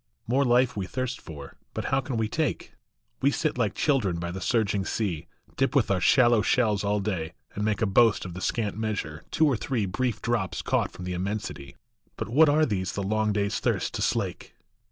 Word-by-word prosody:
ORE 130 +4 +3
life 125 0 +3
we 95 -3 -3
thirst 130 +2 -3
for, 75 -4 -10 0.2
but - - -3
how 135 - +3
can 130 -2 -4
we 110 -1 +1
take? 150 +3 -2 0.5
We 140 - +4
sit 150 +2 0
like 115 -5 0
children 115 - +1
by 85 +1 -4
the 95 +1 -6
surging 105 -2 +1
sea, 95 -6 -2 0.3
Dip 135 +3 +1
with 125 -7 +3
our 95 -2 +1
shallow 120 - +5
shells 105 -1 +2
all 105 +1 +1
day, 95 -6 -3 0.2
and 105 - -3
make 105 0 0
A - - +4
boast 110 +1 +4
of 90 - -6
the 95 - -7
scant 110 -1 -1
measure, 100 -8 -3
two 160 - +3
or 140 -4 +3
three 115 -1 -1
Brief 110 +4 -1
drops 115 -6 -1
caught - - 0
from 90 - -9
the 90 - -3
immensity; 90 -7 -4 0.4
But - - -4
what 150 +6 +6
are 155 +2 +4
these 95 -7 -2
the 100 - -2
long 110 +2 +1
day 105 -1 +1
s 100 - -2
thirst - - 0
to - - -3
slake - - -2
110 Hz, 215 wpm, -27 LUFS, 95-125 Hz, 0.5 s, what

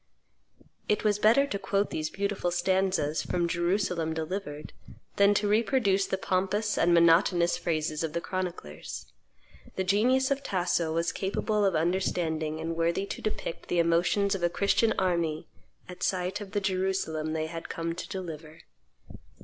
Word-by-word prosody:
It 210 - +1
was 210 -1 +2
better 230 +7 +5
to 200 -8 -4
quote 200 +1 0
these 155 0 -2
beautiful 200 -2 -2
stanzas 185 -4 +1
from 175 -1 -1
"Jerusalem 175 -2 0
Delivered" 160 -2 -5 0.4
than 200 +1 +5
to 210 +1 +1
reproduce 210 -2 +2
the 190 - -1
pompous 195 +3 0
and 175 - +3
monotonous 170 +1 +4
phrases 155 -1 -2
of 160 -2 -3
the 170 - 0
chroniclers. 175 - -6 0.6
The 190 - 0
genius 250 +8 +2
of 275 0 +1
Tasso 175 - 0
was 165 +1 0
capable 205 +3 -1
of 195 -3 +2
understanding 160 -2 0
and 165 +1 -3
worthy 170 +3 0
to - - -6
depict 215 -5 -4
the 175 - 0
emotions 175 +4 +2
of 195 - -3
a 175 - +2
Christian 200 +5 +2
army 170 -4 0 0.4
at 180 - -10
sight 185 +2 -1
of 200 -1 -9
the 205 - 0
Jerusalem 185 -5 -1
they 160 0 -1
had 165 +1 -7
come 165 0 -3
to 175 - -7
deliver. 160 -3 -7
180 Hz, 155 wpm, -28 LUFS, 165-200 Hz, 0.6 s, better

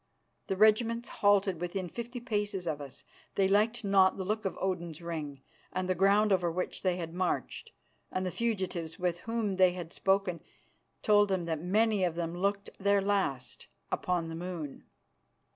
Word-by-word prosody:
The 195 - 0
regiments 230 +3 +3
halted 200 -4 +2
within 180 +1 -3
fifty 240 +6 -6
paces 205 -6 -2
of 155 -3 -2
us. 140 -2 -9 0.3
They 195 -1 +3
liked 220 +4 +2
not 195 -2 +4
the 190 - -3
look 215 +2 -2
of 190 - -2
Odin's 175 -4 -2
Ring, 155 -5 -5 0.3
and 185 0 -2
the 185 - +2
ground 200 +3 +4
over 175 -2 +1
which 180 +2 -3
they 185 -2 +1
had 165 -2 -5
marched 185 - -2 0.4
and 185 0 -1
the 185 - -1
fugitives 185 -8 -2
with 175 -1 -1
whom 225 -3 -2
they 185 -1 +5
had 175 -2 -7
spoken 195 -3 +1 0.6
told 205 -1 +5
them 190 -2 0
that 160 -2 -2
many 210 +3 +2
of 175 -2 +1
them 170 0 -3
looked 200 +2 -1
their 200 0 +3
last 190 -11 -1 0.2
upon 175 -2 0
the 165 - -6
moon. 165 -4 -6
185 Hz, 170 wpm, -31 LUFS, 170-205 Hz, 0.6 s, they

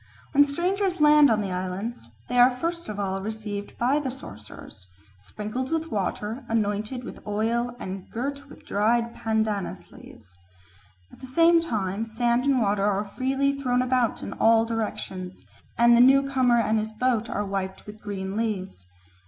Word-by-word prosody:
When 285 0 +6
strangers 360 +6 -1
land 300 -1 +7
on 215 -1 +2
the 195 -2 -3
islands, 185 - -4 0.2
they 245 - +1
are 245 +1 +8
first 335 +6 -3
of 210 -1 -5
all 195 -1 -2
received 210 -1 -6
by 260 +5 +2
the 285 -3 -3
sorcerers, 105 - -11 0.3
sprinkled 215 - -5
with 325 -1 -2
water, 210 +4 -3
anointed 215 +3 -1
with - - -8
oil, 230 +3 -1
and 190 -4 -7
girt 280 +4 -5
with - - -15
dried 230 +3 +1
pandanus 220 -3 -2
leaves. 90 -5 -15 0.8
At - - -16
the 260 - -9
same 335 +5 +5
time 210 - -2
sand 235 +2 0
and 275 -2 +3
water 200 -2 +1
are 205 0 +1
freely 270 +6 0
thrown 255 -3 0
about 255 -2 0
in - - -5
all 225 0 +4
directions, 210 -5 -4 0.3
and 235 0 +6
the 235 - +6
newcomer 265 -2 +4
and 220 -1 +2
his 215 +1 -4
boat 235 0 0
are 205 - -2
wiped 190 -1 -4
with 210 +1 -11
green 195 -1 -5
leaves. 195 - -3
225 Hz, 160 wpm, -25 LUFS, 205-260 Hz, 0.8 s, are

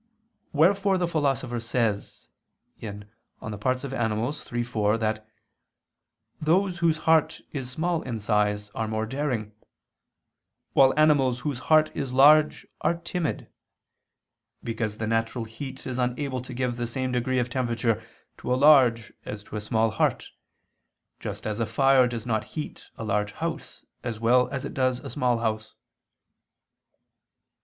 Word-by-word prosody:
Wherefore 190 +5 +3
the 180 -1 0
Philosopher 135 -7 0
says 115 -3 -2 0.5
(De 110 -3 -5 0.7
Part. 130 +4 0
Animal. 115 +1 0 0.2
iii, 120 0 0
4) 110 -3 +1
that 110 -1 -2 1.1
"those 175 +3 +2
whose 165 -2 +2
heart 160 -1 +3
is 135 -4 -4
small 165 +5 -1
in 120 -3 -4
size, 105 -1 0
are 110 - -2
more 110 0 -1
daring; 125 -4 -2 1.2
while 135 -1 +6
animals 140 -5 +3
whose 140 -4 -3
heart 155 -1 +5
is 130 -2 -3
large 150 +3 +5 0.2
are 170 - +2
timid; 170 -1 -3 1.2
because 110 -2 -3
the 110 - -3
natural 115 +1 -1
heat 130 +4 -8
is 130 -1 -3
unable 130 +1 -1
to 125 0 -9
give 125 -1 -1
the 120 -1 -2
same 130 +2 -2
degree 125 +1 0
of 125 -1 0
temperature 120 -3 0 0.4
to - - -5
a - - +4
large 130 -6 +5
as 105 -1 -7
to 110 - -10
a 105 - -2
small 110 0 +1
heart; 110 - 0 0.9
just - - -6
as 110 +1 -2
a 115 - 0
fire 135 0 +4
does 120 -2 -5
not 110 -3 -1
heat 150 - -6
a - - -5
large 105 -1 -1
house 165 -1 -5 0.2
as 115 -3 -4
well 125 +2 +4
as 130 - -4
it - - -6
does 130 -1 +1
a - - -8
small 125 0 +1
house." 110 -2 -3
125 Hz, 145 wpm, -26 LUFS, 115-145 Hz, 1.2 s, while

